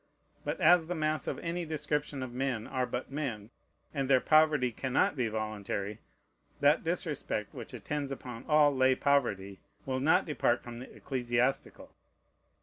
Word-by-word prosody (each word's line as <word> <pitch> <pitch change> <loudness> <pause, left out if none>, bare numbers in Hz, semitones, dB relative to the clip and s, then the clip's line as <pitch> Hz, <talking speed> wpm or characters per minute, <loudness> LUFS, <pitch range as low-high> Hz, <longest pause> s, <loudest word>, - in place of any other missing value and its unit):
But - - -3
as 170 0 +5
the 180 - -2
mass 155 -1 -1
of - - -2
any 170 +1 -3
description 150 -3 -2
of 125 -2 -7
men 125 -3 -2
are 130 -2 -1
but 125 +2 -4
men, 120 -7 -4 0.4
and 135 -3 -1
their 130 -2 +6
poverty 155 -4 +4
cannot 130 +5 +1
be 125 -4 0
voluntary, 105 -1 -3 0.6
that - - +4
disrespect - - -2
which - - -8
attends 145 -2 -3
upon 125 -3 -7
all 150 -2 +5
lay 130 0 +4
poverty 100 -10 +1 0.3
will 130 -1 -1
not 160 +7 +3
depart 125 -6 +1
from 120 -1 -8
the 130 - -10
ecclesiastical. 125 0 -2
130 Hz, 150 wpm, -31 LUFS, 120-150 Hz, 0.6 s, their